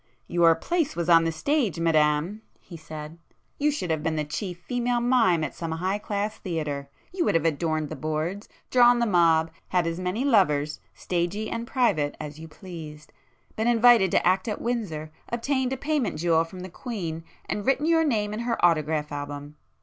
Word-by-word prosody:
"Your 170 -1 +4
place 320 - -1
was 170 - -1
the 165 -1 +5
stage, 215 - 0
Madam!" 160 +4 +2 0.2
he 175 - -12
said—"You 160 - -6
should 230 - -2
have 160 -1 0
been 160 +1 -1
the 155 - 0
chief 175 +4 -5
female 245 +4 -1
mime 235 -9 +3
at 145 - -3
some 165 -1 -5
'high 185 +5 -1
class' 210 +1 -3
theatre! 150 -6 -4 0.2
You 365 -2 0
would - - +1
have 165 -1 +2
adorned 155 -1 0
the 155 - -5
boards, 155 +7 -3 0.2
drawn 245 -1 +6
the 240 - +2
mob, 165 -5 +3 0.2
had 180 -2 +1
as 165 +1 -2
many 185 +8 -2
lovers, 150 - +2 0.2
stagey 180 +5 -2
and 230 0 -4
private 190 - +1
as 150 0 -7
you 160 - -9
pleased, 155 -4 -10 0.4
been 220 +2 0
invited 235 -4 +6
to - - +2
act 185 +2 +2
at 210 - -2
Windsor, 190 -11 -3 0.2
obtained 260 +2 -1
a 265 - -2
payment 290 -2 -1
jewel 165 0 +2
from 180 +2 -10
the 185 - -7
Queen, 170 -7 -5 0.2
and 205 - -3
written 270 +2 +2
your 325 0 +4
name 210 -8 0
in 215 - -4
her 235 0 -1
autograph 155 -2 +1
album. 145 0 -6
175 Hz, 180 wpm, -26 LUFS, 155-230 Hz, 0.4 s, drawn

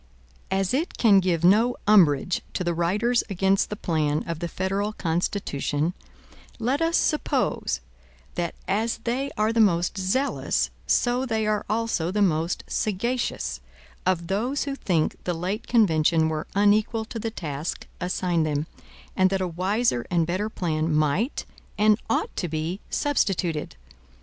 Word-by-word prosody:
As 190 +1 0
it 310 +7 -1
can 205 -5 +6
give 175 -3 0
no 220 +7 +5
umbrage 180 -6 +4
to - - -1
the 175 -1 0
writers 205 +9 +1
against 195 0 +2
the 210 - -3
plan 155 -5 0
of 165 -2 -3
the 170 - -2
federal 195 +4 -2
Constitution, 165 -3 -1 0.6
let 255 +6 0
us 330 +1 +3
suppose, 300 - 0 0.5
that 175 -1 -3
as 220 +3 0
they 260 +4 -1
are 215 +1 +2
the 230 - +1
most 175 -2 +2
zealous, 260 +10 0 0.2
so 245 +1 +2
they 220 -2 0
are 210 -1 0
also 215 -6 0
the 205 +2 +2
most 165 -1 0
sagacious, 205 - -2 0.4
of 180 -2 +1
those 230 +10 -1
who 280 - -3
think 175 - -1
the 180 - -1
late 185 +6 -3
convention 160 -7 +3
were 155 0 -3
unequal 210 +2 +3
to 225 +1 -6
the 225 - -2
task 155 -7 -5
assigned 180 -2 0
them, 150 -1 -1 0.5
and 185 0 +4
that 195 0 0
a 185 - -1
wiser 185 - 0
and 170 -2 +2
better 185 +6 -1
plan 160 -5 -1
might 155 - +1 0.3
and 215 +1 +4
ought - - 0
to 175 - -1
be 160 +4 -3
substituted. 185 - 0
190 Hz, 150 wpm, -25 LUFS, 165-220 Hz, 0.6 s, can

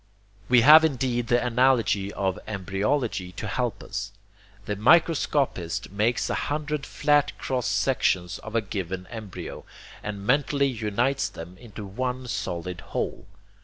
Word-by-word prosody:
We 125 -1 +6
have 155 +6 +9
indeed 125 -5 0
the 120 +1 +2
analogy 115 -5 +2
of 95 -2 -1
embryology 100 0 -1
to 95 - -6
help 110 0 -2
us. 105 0 -5 0.5
The 105 - -2
microscopist 140 - +2
makes 110 +4 +1
a - - -1 0.2
hundred 150 -1 -2
flat 145 -1 +2
cross 125 -2 -2
sections 95 -9 +1
of 110 +1 -8
a 115 - +3
given 95 -3 -4
embryo, 110 -5 -7 0.4
and 100 -1 -6
mentally 140 +2 +2
unites 120 +3 0
them 85 +2 -10
into 110 -3 -9
one 125 +5 -3
solid 90 -5 -4
whole. - - -4
115 Hz, 130 wpm, -26 LUFS, 100-130 Hz, 0.5 s, have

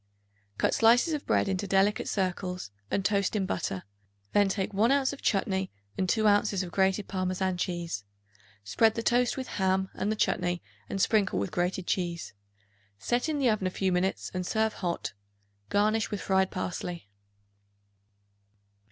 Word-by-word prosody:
Cut - - +2
slices 240 +8 +5
of 295 - -4
bread - - +2
into 195 +1 -1
delicate 195 +2 +2
circles 185 - -2 0.2
and 195 - -1
toast 200 +1 +1
in 200 -2 +1
butter; 95 - -2 0.5
then 205 -1 +4
take 195 0 -2
1 220 +5 +3
ounce 275 -1 +2
of 280 - -10
chutney 190 -1 0 0.2
and 185 -1 -1
2 220 +2 +2
ounces 205 -2 +3
of 175 - -7
grated 190 +2 +1
Parmesan 185 0 -1
cheese; 175 - -3 0.6
spread 220 - +3
the 230 - -2
toast 245 +2 +2
with 260 - -3
ham 190 0 0
and 205 - -1
the - - 0
chutney 175 -4 0 0.3
and 195 - -3
sprinkle 205 0 +2
with 100 +1 -1
grated 180 +1 -1
cheese. 175 -2 -2 0.6
Set 240 - 0
in 305 - 0
the 260 -5 +3
oven 205 -3 0
a - - +1
few 190 +1 -1
minutes 180 +2 0
and 185 0 -2
serve 220 +4 0
hot, 175 -2 -3 0.6
garnished 215 +2 +2
with 205 - -3
fried 190 +2 +2
parsley. 180 - -4
190 Hz, 160 wpm, -29 LUFS, 185-215 Hz, 0.6 s, slices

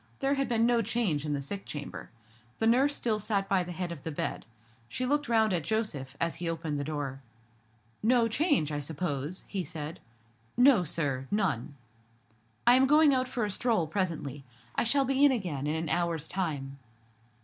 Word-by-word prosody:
There 275 +1 +1
had 275 -1 -1
been 230 -1 +3
no 240 -1 +3
change 205 -9 0
in 150 - -1
the 140 - -2
sick 195 +8 -5
chamber. 145 -1 -7 0.5
The 225 - 0
nurse 265 +5 +4
still 220 -3 0
sat 200 -2 -1
by 195 -2 +2
the 180 0 -5
head 175 0 -4
of 165 -5 -7
the 160 - -5
bed. 145 - -3 0.4
She 255 - -2
looked 290 0 0
round 220 -3 +3
at 170 -3 0
Joseph, 150 -12 -2
as 165 0 -1
he 170 0 -2
opened 160 -3 -3
the - - -1
door. 140 -3 -4 0.8
"No 235 +1 +4
change, 245 - +1
I 145 - -2
suppose?" 150 +1 -4
he 195 -3 -2
said. 155 -1 -6 0.6
"No, 245 -6 +6
sir; 140 -5 -2
none." 160 - -1 0.9
"I 240 - +7
am 260 +1 +5
going 300 0 +6
out 255 -1 +1
for 240 -3 -1
a 205 - -2
stroll, 220 -5 +1
presently. 155 -6 -3 0.3
I - - 0
shall 275 +4 +3
be 270 +1 +2
in 290 - +7
again 170 - -2
in 150 - 0
an 160 +1 -2
hour's 170 -1 0
time." 140 -7 -3
180 Hz, 190 wpm, -29 LUFS, 150-235 Hz, 0.9 s, I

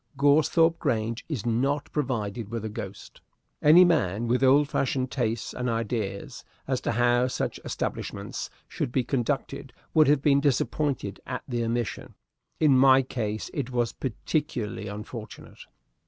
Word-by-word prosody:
Goresthorpe 155 +4 +4
Grange 115 -5 -1
is 130 -10 -3
not 135 +5 0
provided 115 -7 -2
with 115 -1 -4
a - - -3
ghost. 105 - -8 0.4
Any 165 +5 +8
man 120 - +1
with 125 +3 +1
old 140 +2 +5
fashioned 130 -2 -1
tastes 115 -3 -2
and 125 0 -2
ideas 115 -3 -3 0.2
as 130 -1 -1
to - - -1
how 120 +1 +3
such 130 - -3
establishments - - -4 0.2
should - - -3
be 130 0 +1
conducted 120 -1 -2 0.2
would 155 -1 +5
have 145 -1 +3
been 140 -2 +4
disappointed 140 -6 0
at 125 0 -4
the 120 -3 -1
omission. 115 0 -3 0.4
In 150 -4 +5
my 130 0 +6
case 110 -4 -4
it 135 -4 -3
was 120 -2 0
particularly 130 -3 -3
unfortunate. 105 +2 -8
125 Hz, 140 wpm, -27 LUFS, 115-140 Hz, 0.4 s, Any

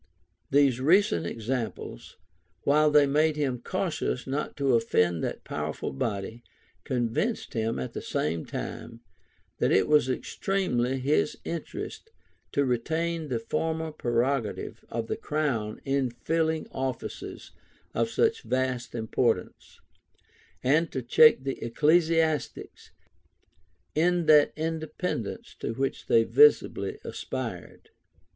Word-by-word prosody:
These 135 -3 +4
recent 140 - +3
examples, 115 - -5 0.5
while 150 +2 +4
they 150 -1 +6
made 150 +2 +2
him 135 -5 -1
cautious - - -2
not 140 +3 -3
to 140 -2 +2
offend 90 -8 +2
that - - -3
powerful - - -4
body, 105 - -3 0.4
convinced 125 - -1
him, 115 0 -1
at 65 - -4
the - - -4
same 80 +1 -2
time, 115 0 -6 0.6
that - - +2
it 95 - +4
was 150 -4 +4
extremely 130 -4 -1
his 135 +4 +1
interest 170 - -6 0.4
to 140 - +2
retain 160 +6 -1
the 125 -4 -1
former 160 +7 -2
prerogative 120 -3 -1
of 115 -1 -3
the - - -2
crown 130 -9 -2
in 135 -2 +1
filling 160 +6 -1
offices 130 -1 -5 0.4
of - - 0
such 450 0 +1
vast 130 -2 -2
importance, 115 -3 -1 0.8
and 155 +5 +2
to 130 - -3
check 135 +3 +6
the 135 0 -4
ecclesiastics 160 +4 +1 1.0
in 175 +2 +2
that 150 -2 +6
independence 160 - -4
to 115 - -3
which 135 +2 -2
they 115 - +5
visibly 445 - +4
aspired. 445 - -6
135 Hz, 115 wpm, -27 LUFS, 115-160 Hz, 1.0 s, they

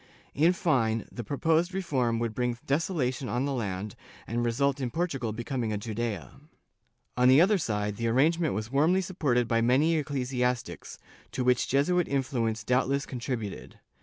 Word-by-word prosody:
In 160 +4 +4
fine, 125 - 0
the 120 - -6
proposed 165 - +1
reform 130 -11 0
would 115 -1 -2
bring 125 0 -1
desolation 135 -4 -1
on 125 +3 0
the 140 - -1
land 100 -4 -4 0.3
and 120 +1 -2
result 135 +4 0
in 125 - -1
Portugal 135 -7 -2
becoming 120 +1 -3
a 105 - -1
Judea. 110 +1 -4 0.8
On 125 0 +4
the 130 +3 +7
other 195 +4 +4
side, 105 - -2
the 115 - -1
arrangement 155 - +2
was 110 +3 -4
warmly 160 +7 +3
supported 140 -10 0
by 115 -1 +2
many 135 +8 +3
ecclesiastics, 125 -4 -2 0.4
to 130 - -1
which 125 -1 +2
Jesuit 170 +6 +2
influence 120 -5 -1
doubtless 135 +4 +1
contributed. 120 -5 -5
125 Hz, 155 wpm, -28 LUFS, 115-145 Hz, 0.8 s, the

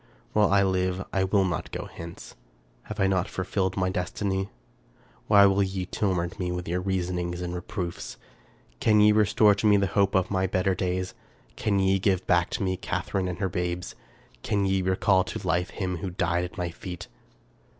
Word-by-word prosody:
While 105 -2 +3
I 100 0 +5
live 95 -1 0
I 95 - +2
will 95 +1 +3
not 85 -5 -2
go - - -4
hence. 85 0 -10 0.5
Have 110 0 -7
I 95 - +4
not 95 -1 +1
fulfilled 95 0 -2
my 95 -1 +1
destiny? 95 +2 -2 0.8
Why 100 -1 +7
will 100 0 +3
ye 95 -1 -1
torment 90 -3 -1
me 90 -1 -1
with 90 0 -4
your 90 +2 -1
reasonings 90 -2 -2
and 90 0 -4
re 90 - -4
proofs? 85 -1 -5 0.6
Can 105 -1 +4
ye 105 0 +7
restore 105 0 +5
to 100 +2 0
me 105 -1 +6
the 100 - +2
hope 100 0 +1
of 95 0 +2
my 95 -1 +1
better 95 +1 +1
days? 90 0 -2 0.4
Can 105 -2 0
ye 95 0 +3
give 95 -1 +2
me - - -30
back 85 -1 +2 0.3
Catharine 95 -2 -2
and 90 -2 -4
her 95 - 0
babes? 90 0 -3 0.5
Can 100 - 0
ye 95 0 +1
recall 95 +1 +3
to - - -6
life 90 +3 +1
him 90 -3 -3
who 95 +3 -4
died 90 0 0
at 90 - -10
my 90 -2 -2
feet? 90 +1 -8
95 Hz, 190 wpm, -26 LUFS, 90-100 Hz, 0.8 s, Why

